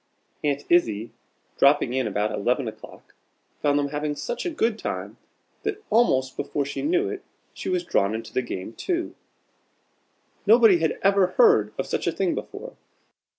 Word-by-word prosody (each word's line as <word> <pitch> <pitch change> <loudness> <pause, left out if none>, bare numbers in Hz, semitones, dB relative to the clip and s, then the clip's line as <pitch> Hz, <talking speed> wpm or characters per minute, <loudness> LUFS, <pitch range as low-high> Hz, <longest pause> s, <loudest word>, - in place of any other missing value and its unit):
Aunt 145 -1 0
Izzie, 115 -10 +2 0.5
dropping 140 -3 +4
in 130 -3 0
about 105 +1 -1
eleven 125 +5 0
o'clock, 110 - -11 0.5
found 145 -1 +2
them 145 -1 0
having 150 0 -2
such 485 - -4
a - - 0
good 230 -9 0
time, - - -5 0.4
that 425 0 -4
almost 130 - +3
before 145 - -2
she 140 - -4
knew 355 +6 +1
it, 405 -1 -5 0.3
she - - -5
was 365 -1 0
drawn 100 - +1
into 115 - -7
the - - +1
game 105 -3 -6
too. 350 - -2 1.3
Nobody 220 -4 +7
had 160 -1 0
ever 195 -1 +3
heard 445 -3 +5
of - - -2
such - - -2
a - - +3
thing - - 0
before! - - -7
150 Hz, 160 wpm, -25 LUFS, -, 1.3 s, Nobody